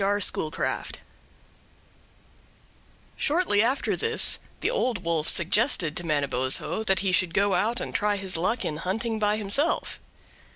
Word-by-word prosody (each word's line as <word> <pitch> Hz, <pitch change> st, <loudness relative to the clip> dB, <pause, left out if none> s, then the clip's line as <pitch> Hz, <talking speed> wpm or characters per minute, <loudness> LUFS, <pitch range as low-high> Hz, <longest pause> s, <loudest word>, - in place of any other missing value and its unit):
R. 205 Hz, +1 st, +1 dB
Schoolcraft 160 Hz, -5 st, 0 dB, 2.2 s
Shortly 300 Hz, -, +2 dB
after 250 Hz, +5 st, 0 dB
this 450 Hz, -1 st, 0 dB, 0.2 s
the -, -, 0 dB
Old 250 Hz, -, -1 dB
Wolf 165 Hz, -2 st, -1 dB
suggested 170 Hz, -, +2 dB
to 175 Hz, -, -5 dB
Manabozho 140 Hz, -, 0 dB
that 190 Hz, -2 st, +2 dB
he 195 Hz, -1 st, 0 dB
should 185 Hz, -2 st, +2 dB
go 200 Hz, 0 st, +2 dB
out 230 Hz, +5 st, 0 dB
and -, -, -6 dB
try 210 Hz, 0 st, +1 dB
his 190 Hz, -2 st, -1 dB
luck 185 Hz, +9 st, -1 dB
in 150 Hz, -, -3 dB
hunting 220 Hz, +6 st, -2 dB
by 210 Hz, 0 st, +1 dB
himself. 215 Hz, +10 st, 0 dB
200 Hz, 135 wpm, -26 LUFS, 170-230 Hz, 2.2 s, Shortly